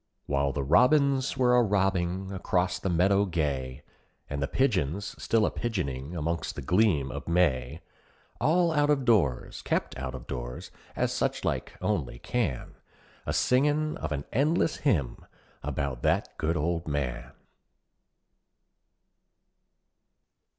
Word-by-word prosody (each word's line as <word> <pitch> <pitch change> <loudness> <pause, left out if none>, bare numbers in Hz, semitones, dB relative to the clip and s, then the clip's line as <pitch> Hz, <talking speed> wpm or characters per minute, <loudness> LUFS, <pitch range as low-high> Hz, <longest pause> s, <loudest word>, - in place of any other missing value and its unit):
While 70 0 +1
the 70 0 -2
robins 135 - +3
were 125 -1 +4
a 125 - +6
robbing 95 -3 0
acrost 90 -1 -1
the 95 - -1
meadow 95 +4 +3
gay, 70 -8 -2 0.4
And 70 0 -4
the 70 - 0
pigeons 100 - 0
still 115 -2 +2
a - - 0
pigeoning 85 - -3
among 85 +1 -1
the 70 - -6
gleam 90 -5 +2
of - - -7
May, 80 -4 +1 0.6
All 170 +2 +3
out 145 -2 +2
of 140 -3 +2
doors 90 - +1
kept - - -1
out 65 0 -4
of 65 - -9
doors 60 -1 -6 0.2
as - - 0
suchlike - - -2
only - - -1
can, 100 - -2 0.5
A - - 0
singing 150 +4 +2
of 75 - -5
an 70 -1 -3
endless 155 +5 +2
hymn 85 - 0 0.4
about 70 -3 -3
that - - 0
good 80 +2 0
old 85 +2 -1
man. 65 -5 -3
90 Hz, 130 wpm, -28 LUFS, -, 0.6 s, a